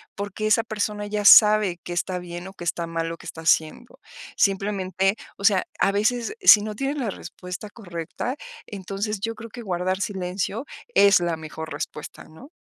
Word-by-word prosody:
Porque 205 +1 -3
esa 220 +2 +4
persona 210 -2 -3
ya 210 0 -2
sabe 210 -4 +7
qué 175 - -5
está 180 +1 -2
bien 175 +1 -8
o 190 - -10
qué 180 - -10
está 170 0 -2
mal 165 0 -2
lo 165 - -6
que - - -15
está 160 - -8
haciendo, 160 +9 0 0.4
simplemente, 195 -1 +1 0.2
o 200 - -10
sea, 200 -3 +4
a - - +3
veces, 230 - 0
si 210 - +9
no 215 0 -5
tienes 275 +6 -2
la 240 -6 -2
respuesta 180 +4 -8
correcta, 185 - -5 0.3
entonces, 200 +1 -4
yo 225 +1 -2
creo 230 +1 -9
que 240 - -8
guardar 185 0 -1
silencio 195 +4 -3 0.3
es 200 -2 +6
la 170 -2 -1
mejor 160 0 -8
respuesta, 150 - -7
¿no? 160 - -15
195 Hz, 180 wpm, -24 LUFS, 175-215 Hz, 0.4 s, si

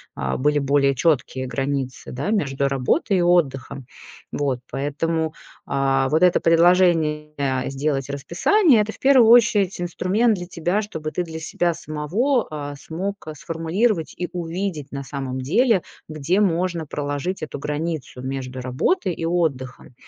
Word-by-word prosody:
а, 65 -1 -2
были 150 +2 +2
более 140 0 +2
чёткие 130 -3 0
границы, 135 -1 -3
да, 140 +11 -3
между 140 -10 0
работой 135 - +1
и - - +2
отдыхом. 140 -7 +1 0.5
Вот, 135 -3 -1
поэтому, 155 +4 -2 0.3
а, 135 -1 +1
вот 155 +3 +2
это 180 -1 +4
предложение 165 -3 +3 0.4
сделать 135 0 -2
расписание- 220 - +3
это 210 +1 -2
в - - -16
первую 260 -4 +6
очередь 215 -6 +4
инструмент 185 +6 +1
для 175 -2 -6
тебя, 175 +3 -1
чтобы 160 -7 -5
ты 180 - -1
для 160 -1 -7
себя 170 +2 -1
самого, 175 - -1
э, 145 -1 -5
смог, 185 +7 -4
э, 155 - -5
сформулировать 165 +4 -1
и 180 - -2
увидеть 170 -3 -4
на 140 -1 -5
самом 135 -2 -5
деле, 195 - +2 0.3
где 155 +6 0
можно 175 -3 0
проложить 145 +5 -3
эту 145 -2 -6
границу 150 -3 -4
между 130 -1 -5
работой 130 - 0
и 165 - -4
отдыхом, 145 -8 -2
160 Hz, 145 wpm, -22 LUFS, 140-180 Hz, 0.5 s, первую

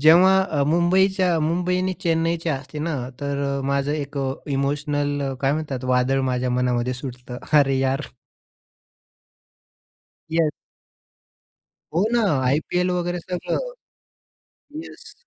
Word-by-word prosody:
जेव्हा 180 +5 +7 0.2
अ, - - +4
मुंबईच्या 180 +2 +3
मुंबई 175 +3 +1
आणि 185 0 0
चेन्नईच्या 165 -1 +1
असते 140 +2 -8
ना, 160 0 -2 0.3
तर 140 0 -2 0.2
अ, - - -3
माझं 140 +1 0
एक 145 -1 -4
अ, 135 -1 0 0.2
इमोशनल 145 0 -1
काय 135 0 +2
म्हणतात 145 -5 -3
वादळ 130 +2 +2
माझ्या 125 0 0
मनामध्ये 125 0 0
सुटतं, 125 -1 -7
अरे 135 -3 +4
यार. 135 +2 -1 2.2
येस. 160 -2 +2 1.4
हो 180 +5 +3
ना, 240 - +3 0.2
आय-पी-एल 160 +7 +1
वगैरे 175 0 -1
सगळं. 180 +1 -3 1.3
येस - - -11
150 Hz, 115 wpm, -23 LUFS, 135-170 Hz, 2.2 s, जेव्हा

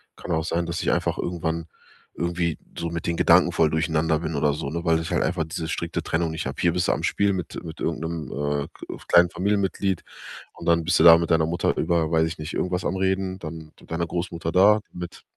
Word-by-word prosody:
Kann - - -7
auch 80 -1 +1
sein, 85 +1 -1
dass 85 +1 -3
ich - - +1
einfach - - 0
irgendwann, 85 -1 -3 0.5
irgendwie 85 -1 -1 0.2
so 85 - -2
mit 85 0 -4
den 85 - 0
Gedanken - - +5
voll 80 -1 +3
durcheinander 80 0 +1
bin 80 -2 -4
oder 75 +1 +2
so, 70 -1 -4
ne, 85 +2 -4
weil 80 -1 +3
ich 80 - -5
halt - - +2
einfach 85 -2 -1
diese 80 0 -5
strikte 85 +1 -3
Trennung 80 0 -1
nicht 80 - -4
habe. - - -5
Hier 85 -1 +3
bist 90 0 0
du - - +4
am - - -4
Spiel 100 0 +2
mit 90 -3 -5
mit 80 -1 -8
irgend 80 -1 -2
'nem, 80 -1 -4 0.3
äh, - - -11
k - - -9
kleinen 85 0 +6
Familienmitglied 95 -1 0 0.5
und - - -11
dann 85 -1 +3
bist 90 +1 +2
du - - +5
da 85 -1 +10
mit 85 0 -2
deiner 80 -1 +4
Mutter 85 0 0
über, 85 -1 +1
weiß 80 0 +3
ich 80 - -6
nicht, 80 +1 -6
irgendwas 90 0 -1
am 95 - -1
Reden, 95 0 -1
dann 80 -1 -8 0.2
deiner 85 +1 -2
Großmutter 85 -1 -3
da, 100 +4 +5
mit 90 -1 -8
85 Hz, 235 wpm, -24 LUFS, 80-90 Hz, 0.5 s, da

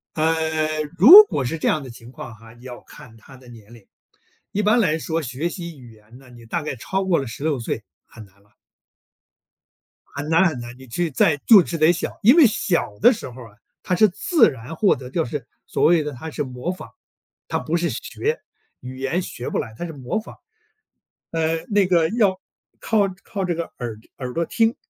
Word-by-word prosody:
呃， 155 -1 0 0.2
如 360 - +11
果 145 - -3
是 145 +7 -2
这 - - 0
样 155 - +1
的 130 - -9
情 120 0 -13
况 120 -3 -9
啊， 115 +1 -16
你 120 +1 -18
要 125 -1 -9
看 115 -2 -15
他 130 +4 -16
的 125 -1 -18
年 115 -1 -15
龄。 115 -5 -16 0.6
一 210 - -1
般 215 +3 +3
来 165 -8 +2
说 160 +1 -3
学 135 +6 -3
习 170 -4 -8
语 125 -3 -14
言 110 +3 -18
呢， 135 - -18
你 120 -1 -15
大 165 +9 -3
概 145 - -5
超 190 +11 -3
过 190 -3 +1
了 135 - -3
16 140 +5 -3
岁， 115 -1 -4 0.2
很 115 - -14
难 100 0 -27
了。 105 +1 -31 1.6
很 145 +1 -7
难 165 +4 +4
很 145 -6 -5
难， 120 +1 -9
你 130 - -13
去 165 +8 -2
再 145 +3 +2
就 205 -6 +8
是 165 - -4
得 155 +2 +5
小。 170 - -5
因 240 +7 +7
为 310 -6 +8
小 170 - -1
的 250 - +7
时 215 - -6
候 125 +1 -11
啊， 105 -2 -17 0.3
他 180 - -1
是 215 +4 +5
自 215 - +3
然 130 +4 -9
获 200 +4 +3
得， 125 0 -10
就 165 +2 -1
是， 130 0 -6 0.2
所 - - -1
谓 165 -1 +4
的 150 -1 -5
他 155 +6 -8
是 150 - -3
模 130 +6 -5
仿， 185 - -11 0.6
他 - - -1
不 165 - -2
是 170 -1 -1
学， 440 - -3 0.4
语 130 +1 -9
言 160 +7 -1
学 120 - -7
不 - - -2
来， 110 -1 -5
他 175 - -4
是 165 - -7
模 135 - -3
仿。 - - -13 1.0
嗯， 165 0 -1
那 200 -3 +3
个 170 -3 +2
要 205 -4 +1 0.4
靠 220 -2 0 0.2
靠 195 -3 -4
这 175 -2 -1
个 170 - -2 0.2
耳 115 -4 -5 0.2
耳 125 -2 -6
朵 170 0 -1
听。 225 +5 +1
155 Hz, 225 characters per minute, -22 LUFS, 125-175 Hz, 1.6 s, 如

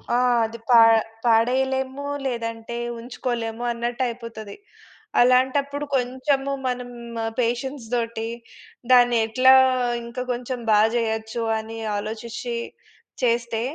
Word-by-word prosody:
ఆహ్, 245 -1 +3
అది 230 +1 -7
పా 235 -2 +8 0.5
పాడయలేము, 265 +4 +1 0.2
లేదంటే 230 -2 -4 0.2
ఉంచుకోలేము 235 -1 -4
అన్నట్టు 235 +1 -3
అయిపోతది. 230 -3 -7 0.7
అలాంటప్పుడు 270 +3 +2
కొంచెము 270 +2 0 0.2
మనం 250 0 -3 0.5
పేషెన్స్‌తోటి 235 -2 -2 0.6
దాన్ని 245 -1 +6
ఎట్లా 255 +4 +5 0.5
ఇంకా 235 +2 -6
కొంచెం 245 +1 -4
బా 210 -1 +5 0.2
చేయొచ్చు 220 0 -2 0.2
అని 225 +1 -8 0.2
ఆలోచిచ్చి 225 +3 -5 0.7
చేస్తే, 235 -1 +1
240 Hz, 90 wpm, -23 LUFS, 230-255 Hz, 0.7 s, పా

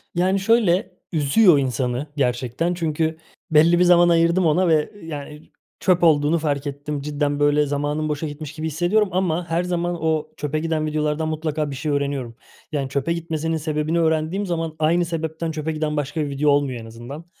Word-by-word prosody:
Yani 185 +3 +2
şöyle, 200 -1 +2
üzüyor 165 +3 +4
insanı 130 +1 -1
gerçekten. 125 +5 0
Çünkü 160 -1 -1 0.3
belli 165 +3 +5
bir - - +5
zaman 175 -1 +6
ayırdım 170 +2 +3
ona 170 +4 +3
ve, 155 -2 +2
yani, 150 -1 -8 0.3
çöp 180 -2 +2
olduğunu 155 0 +4
fark 145 -2 -1
ettim. 145 +1 -4
Cidden 145 0 -1
böyle 145 0 +3
zamanım 145 +2 -2
boşa 150 +1 -2
gitmiş 150 0 -7
gibi 155 0 -4
hissediyorum 175 +7 +1
ama 175 -2 -1
her 165 +2 +1
zaman 175 -1 -1
o 160 -1 0
çöpe 150 +1 -2
giden 160 -1 -1
videolardan 155 +1 -1
mutlaka 155 -1 -2
bir - - -5
şey 150 +3 -3
öğreniyorum. 140 -4 -2 0.4
Yani, 140 -3 -2
çöpe 140 +4 -1
gitmesinin 165 -1 -2
sebebini 155 +1 -1
öğrendiğim 160 +4 0
zaman 165 -3 -3
aynı 170 +3 +2
sebepten 160 0 -3
çöpe 155 0 -3
giden 155 -1 -2
başka 145 +2 -2
bir 145 - -2
video 140 +2 +1
olmuyor 140 -4 +1
en - - -10
azından. 120 +8 -9
155 Hz, 175 wpm, -22 LUFS, 145-170 Hz, 0.4 s, zaman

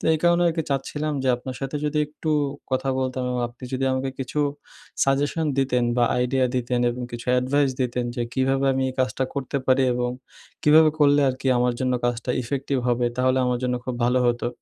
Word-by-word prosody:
তো - - -8
এই - - -1
কারণে 175 0 +4
আর - - 0
কি 165 - +1
চাচ্ছিলাম 150 +3 -2
যে 130 - 0
আপনার 125 +1 -7
সাথে 135 +2 -3
যদি 150 0 0
একটু 155 +1 -5 0.4
কথা 130 +1 0
বলতাম 130 0 -2
এবং 125 - -2
আপনি 120 +2 -22
যদি 130 +1 -1
আমাকে 130 +1 -1
কিছু 135 +2 -4 0.7
সাজেশন 145 +4 +1
দিতেন 125 -2 +2
বা 120 - +4
আইডিয়া 130 +1 +2
দিতেন 125 0 0
এবং 125 +1 -5
কিছু 120 0 -7
অ্যাডভাইস 135 +3 +2
দিতেন 125 -1 -1
যে 120 - 0
কীভাবে 135 +1 +1
আমি 135 0 0
এই - - -11
কাজটা 130 +1 0
করতে 140 0 -3
পারি 130 +1 +4
এবং 125 0 -1 0.5
কীভাবে 155 +1 +6
করলে 145 -1 +5
আর 130 - 0
কি - - -4
আমার 125 0 +2
জন্য 130 -1 +1
কাজটা 120 0 -1
ইফেক্টিভ 135 +2 -2
হবে? 120 0 +1
তাহলে 130 +1 +2
আমার 125 0 0
জন্য 125 0 0
খুব 130 - -3
ভালো 125 +1 +3
হতো। 120 0 -1
130 Hz, 205 wpm, -24 LUFS, 125-140 Hz, 0.7 s, কীভাবে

